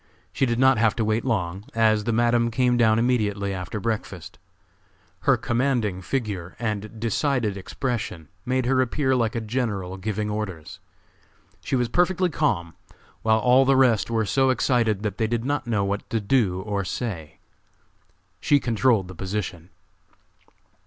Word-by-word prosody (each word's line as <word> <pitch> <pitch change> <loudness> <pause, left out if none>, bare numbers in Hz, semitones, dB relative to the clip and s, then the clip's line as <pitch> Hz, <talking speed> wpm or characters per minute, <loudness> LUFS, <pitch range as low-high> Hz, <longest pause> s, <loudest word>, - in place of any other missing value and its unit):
She 135 - +1
did 115 -1 0
not 130 -2 +4
have 110 -1 +3
to 115 - 0
wait 110 +2 0
long, 95 -6 -2
as 110 -2 +3
the 115 - 0
Madam 120 +1 +2
came 125 +1 +2
down 110 -2 +4
immediately 105 -5 0
after 90 +3 -5
breakfast. 105 -5 -4 0.9
Her - - +5
commanding 120 -6 0
figure 100 -5 -3
and 110 -1 -4
decided 115 -1 0
expression 100 - -4 0.2
made 130 0 0
her 130 +1 +3
appear 130 +1 +1
like 115 -2 0
a - - 0
general 105 -5 -3
giving 105 +2 -3
orders. 95 -5 -5 0.8
She - - -1
was 125 -2 +1
perfectly 180 +6 +1
calm, 90 - 0 0.5
while 110 0 +3
all 125 +4 +5
the 135 0 +3
rest 115 -7 +3
were 115 -1 0
so 135 +5 +2
excited 115 -5 +1
that 105 0 -3
they 110 - +2
did 115 +1 -2
not 145 -2 -1
know 105 -4 +1
what 100 +1 -3
to 115 - 0
do 100 -4 +1
or 100 0 -2
say. 85 -7 -5 1.0
She 145 - +3
controlled 115 -5 +1
the 95 - -9
position. 95 -2 -5
110 Hz, 155 wpm, -24 LUFS, 100-125 Hz, 1.0 s, Her